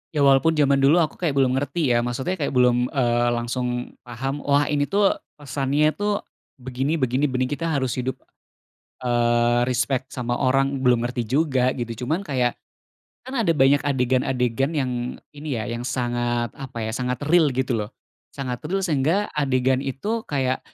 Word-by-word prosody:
Ya, 145 - +3
walaupun 140 +4 +4
zaman 140 -2 +3
dulu 150 +6 +5
aku 155 - -5
kayak 160 -6 0
belum 135 -2 +3
ngerti 145 0 -1
ya, 120 - +3
maksudnya 130 +10 -2
kayak 140 -3 -2
belum, 125 0 +3
eee, 120 -2 +2
langsung 125 +1 -3 0.2
paham, 135 +4 -4
"Wah, 145 0 +2
ini 145 -1 +1
tuh 200 0 +3 0.2
pesannya 145 +1 0
tuh 205 +3 -2 0.3
begini 130 +4 -2
begini 130 0 +1
benih 130 0 -1
Kita 165 +3 -2
harus 140 -6 0
hidup, 130 +1 -2 0.9
eee, 120 0 +2
respek 125 +2 0
sama 120 -2 -2
orang" 135 +1 +1
Belum 125 -2 +4
ngerti 120 0 -2
juga, 130 0 +1
gitu. 120 -1 -5
Cuman 160 +8 0
kayak 125 -8 0 0.7
kan 260 0 -3
ada 165 -7 +2
banyak 135 +1 +5
adegan-adegan 130 0 0
yang 130 -4 0 0.4
ini 145 -2 -4
ya, 110 - -2
yang 120 0 -4
sangat 120 -1 -1
apa 135 -3 -9
ya, 110 - -2
sangat 125 +2 -2
real, 160 -1 +4
gitu 130 -1 0
loh. 105 0 -4 0.5
Sangat 125 -3 -4
real 195 +1 -1
sehingga 165 +5 +1
adegan 130 -3 +1
itu 200 - -3
kayak 130 -3 0
130 Hz, 165 wpm, -23 LUFS, 125-145 Hz, 0.9 s, dulu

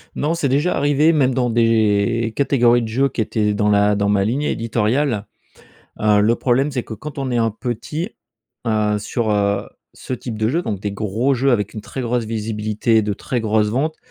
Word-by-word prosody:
Non, 155 +3 0
c'est 155 -5 -1
déjà 145 +7 +1
arrivé 145 +3 +3
même 130 -4 +2
dans 125 -1 0
des 115 0 +2
catégories 120 -4 +3
de 115 - -3
jeux 135 +5 +1
qui 115 - -3
étaient 105 -1 0
dans 105 0 +1
la 105 0 +3
dans 100 0 0
ma 100 -1 +2
ligne 130 +8 -1
éditoriale, 115 -1 0 0.7
heu, 105 -1 +4
le 115 +3 +3
problème, 130 +4 +1
c'est 125 -3 -2
que 110 - -8
quand 145 +6 -9
on 135 -2 -2
est 120 - 0
un 115 -1 +2
petit, 125 - -4 0.6
heu, 105 -2 +1
sur, 110 +2 -2
heu, 100 -1 0 0.2
ce - - -8
type 120 -3 -5
de 110 0 +1
jeu, 165 +7 0
donc 100 -4 -4
des 105 -1 -3
gros 110 +6 0
jeux 135 +2 +1
avec 105 -4 0
une 105 - -5
très 130 - -7
grosse 120 -1 -1
visibilité, 110 0 0
de 105 0 -1
très 120 +4 -3
grosses 110 -1 +1
ventes. 150 +7 -1
115 Hz, 205 wpm, -20 LUFS, 105-130 Hz, 0.7 s, heu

